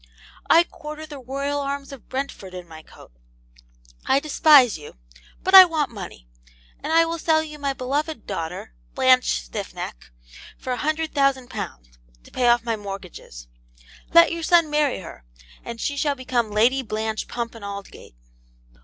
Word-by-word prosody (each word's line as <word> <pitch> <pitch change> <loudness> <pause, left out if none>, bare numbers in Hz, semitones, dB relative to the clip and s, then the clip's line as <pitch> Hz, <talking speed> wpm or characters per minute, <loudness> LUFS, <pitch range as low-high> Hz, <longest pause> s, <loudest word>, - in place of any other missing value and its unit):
I 335 - +7
quarter 305 -2 -9
the 295 -3 -10
Royal 275 +3 -3
Arms 280 0 -4
of 275 -4 -12
Brentford 260 -8 -5
in 180 -1 -8
my 160 -1 -11
coat. - - -17 1.0
I 270 - +4
despise 290 - +5
you, 150 -2 -11 0.5
but 375 - -1
I 380 -1 +13
want 315 -6 -1
money; 180 - -9 0.5
and - - -4
I 330 +1 +5
will 335 0 -4
sell 315 0 +2
you 300 -1 -10
my 280 -1 -1
beloved 280 +1 -3
daughter, 160 - -5 0.2
Blanche 255 - +3
Stiffneck, - - -7 0.5
for 255 - -4
a - - -3
hundred 310 +2 -2
thousand 275 -3 +1
pounds, - - -8 0.2
to - - -18
pay 250 -1 +1
off 240 -1 +4
my 230 -1 -1
mortgages. 195 - -9 0.7
Let 335 0 +7
your 335 0 -4
son 330 -1 +3
marry 295 -8 +1
her, 165 - -11 0.4
and 235 -1 -7
she 285 - -2
shall 285 0 0
become 250 -3 -1
Lady 235 +6 +3
Blanche 220 -2 -3
Pump 235 -1 -4
and 230 -3 -12
Aldgate.' 200 - -9
260 Hz, 160 wpm, -23 LUFS, 210-300 Hz, 1.0 s, I